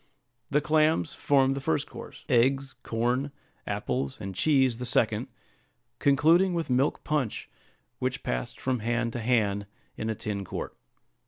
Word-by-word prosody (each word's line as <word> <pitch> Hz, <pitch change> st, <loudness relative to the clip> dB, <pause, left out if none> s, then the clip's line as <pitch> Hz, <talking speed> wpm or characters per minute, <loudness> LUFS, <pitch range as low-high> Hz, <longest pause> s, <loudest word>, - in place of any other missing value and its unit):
The 145 Hz, +1 st, +2 dB
clams 155 Hz, +1 st, +2 dB
formed 135 Hz, -1 st, +3 dB
the 135 Hz, -, -4 dB
first 80 Hz, -, 0 dB
course; -, -, -11 dB
eggs, 135 Hz, +3 st, +2 dB
corn, 120 Hz, +5 st, -1 dB, 0.4 s
apples, 65 Hz, +1 st, -2 dB
and 95 Hz, -2 st, -5 dB
cheese, 130 Hz, -, +3 dB
the 125 Hz, -, -3 dB
second; 115 Hz, 0 st, +1 dB, 0.7 s
concluding 165 Hz, +6 st, +4 dB
with 165 Hz, -5 st, -2 dB
milk 130 Hz, +3 st, +1 dB
punch, 145 Hz, -7 st, -1 dB, 0.5 s
which -, -, -2 dB
passed -, -, -3 dB
from 130 Hz, -2 st, -1 dB
hand 120 Hz, +1 st, -1 dB
to -, -, -3 dB
hand 105 Hz, -4 st, +1 dB, 0.3 s
in 110 Hz, -, -3 dB
a 110 Hz, -, -1 dB
tin 100 Hz, -1 st, -4 dB
quart. -, -, -6 dB
125 Hz, 145 wpm, -28 LUFS, 110-140 Hz, 0.7 s, concluding